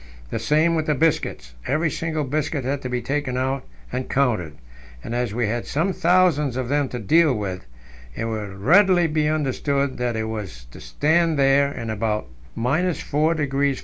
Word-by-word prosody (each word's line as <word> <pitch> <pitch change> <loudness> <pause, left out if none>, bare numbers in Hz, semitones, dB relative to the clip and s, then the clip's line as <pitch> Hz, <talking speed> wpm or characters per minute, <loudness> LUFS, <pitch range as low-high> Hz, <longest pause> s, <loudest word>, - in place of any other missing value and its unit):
The - - -2
same 155 +3 +2
with 160 -2 -1
the 150 - +2
biscuits; 130 - 0
every 155 +3 +1
single 160 0 -2
biscuit 145 0 -2
had 140 +1 -1
to 130 - -5
be 125 -1 -2
taken 135 0 -2
out 130 +1 -1 0.3
and 130 - -3
counted, 110 - 0 0.5
and 115 - -5
as 120 -2 -1
we 120 +2 0
had 115 +3 -2
some 170 +6 0
thousands 165 -7 +2
of 130 -2 -3
them 145 -1 +1
to 125 - -5
deal 140 - +3
with, 95 - -4 0.5
it 115 - -3
will 110 -2 -3
readily 175 - +4
be 155 -1 +1
understood 140 -2 -1
what 120 -1 -1
it 110 - -1
was 105 - -6
to - - -12
stand 160 - +1
there 140 +1 +4
in 115 -5 -5
about 110 0 -1 0.3
4° 145 +1 +1
F. - - -9
140 Hz, 180 wpm, -23 LUFS, 115-155 Hz, 0.5 s, readily